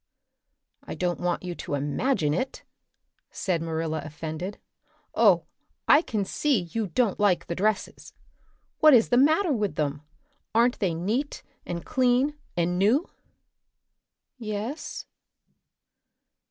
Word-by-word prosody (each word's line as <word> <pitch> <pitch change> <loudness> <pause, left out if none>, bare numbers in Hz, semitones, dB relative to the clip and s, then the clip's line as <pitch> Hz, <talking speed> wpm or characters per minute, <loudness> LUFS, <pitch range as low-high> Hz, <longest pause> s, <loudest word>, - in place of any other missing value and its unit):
"I - - -7
don't 180 -1 -1
want 175 0 -1
you 180 -1 -4
to 145 - -4
imagine 145 - 0
it," 255 - -3 0.7
said 180 -5 -2
Marilla, 160 -1 -2
offended. 160 +5 -6 0.6
"Oh, - - +4 0.4
I 295 - +7
can 215 - -2
see 275 0 +1
you 205 +5 -3
don't 215 +3 0
like 185 -5 +2
the - - -3
dresses! 205 +3 -2 0.7
What 310 -3 +8
is 230 - +4
the 245 - +3
matter 315 +5 +4
with 210 -5 -1
them? 145 -1 -2 0.5
Aren't 240 +2 +3
they 180 -6 0
neat 220 - -2 0.2
and 170 -1 -4
clean 255 +3 +2 0.2
and 175 +1 +1
new?" 235 - +2 1.3
"Yes." 220 +6 -5
200 Hz, 120 wpm, -26 LUFS, 170-250 Hz, 1.3 s, What